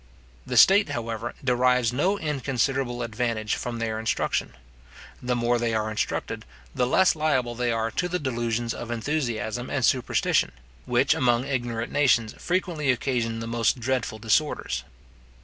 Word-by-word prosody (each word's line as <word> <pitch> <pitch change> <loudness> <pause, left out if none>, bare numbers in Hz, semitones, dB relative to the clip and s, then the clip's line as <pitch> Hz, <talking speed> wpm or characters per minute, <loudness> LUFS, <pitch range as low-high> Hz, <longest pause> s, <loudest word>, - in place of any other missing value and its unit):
The - - -1
state, 200 +2 +7
however, 115 0 -4
derives 125 -2 +2
no 180 +10 +1
inconsiderable 135 - -1
advantage 115 -2 -2
from 120 -1 -3
their 110 -1 -2
instruction. 110 -1 -1 0.7
The 125 0 0
more 120 0 +1
they 115 -1 0
are 110 0 -1
instructed, 110 - -2 0.3
the 125 - +1
less 190 +7 +4
liable 135 -6 +1
they 120 0 -1
are 115 0 -1
to 180 - -1
the 180 - 0
delusions 120 -4 -2
of 120 - -7
enthusiasm 120 -2 -2
and 130 -4 +1
superstition, 125 - +1 0.3
which, - - +3
among 120 0 +2
ignorant 120 -4 -2
nations 125 -6 +3
frequently 175 -5 -1
occasion 120 -3 0
the - - -4
most 115 +1 +1
dreadful 125 -3 -1
disorders. 115 +8 0
120 Hz, 145 wpm, -25 LUFS, 115-135 Hz, 0.7 s, state